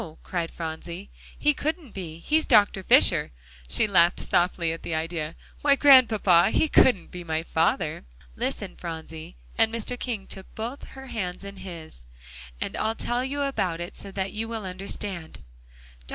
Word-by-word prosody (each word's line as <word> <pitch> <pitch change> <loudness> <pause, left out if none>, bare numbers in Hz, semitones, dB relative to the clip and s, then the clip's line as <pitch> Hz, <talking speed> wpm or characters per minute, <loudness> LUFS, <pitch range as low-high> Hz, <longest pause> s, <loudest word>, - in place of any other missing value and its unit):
cried 170 -2 -3
Phronsie, 170 +3 -7 0.3
"he 295 - +3
couldn't 310 -3 -3
be; 170 -5 -7
he's 310 - +1
Dr. 205 -5 +5
Fisher." - - +4 0.4
She 65 - +4
laughed 175 -3 +4
softly 175 -2 +1
at 165 - -8
the 160 - -3
idea. 160 0 -3 0.3
"Why, 285 -1 +5
Grandpapa, 225 -11 +6
he 315 - +2
couldn't 220 -12 +4
be 180 -1 -7
my 160 -1 -2
father." 165 - 0 0.3
"Listen, - - -3
Phronsie," 160 - -7 0.2
and 225 0 +4
Mr. 230 +2 -3
King 225 -6 -3
took 190 -1 -8
both 235 +5 -5
her 265 - -8
hands 185 -7 -4
in 200 0 -8
his, 165 - -10 0.5
"and - - -3
I'll 220 +1 0
tell 240 +2 -1
you 285 +2 -2
about 185 -12 -1
it 175 +2 -6
so 200 - -6
that 190 0 -3
you 220 +1 -3
will 225 -3 -5
understand. 185 -2 -4 0.7
Dr. - - -16
190 Hz, 165 wpm, -26 LUFS, 170-230 Hz, 0.7 s, Grandpapa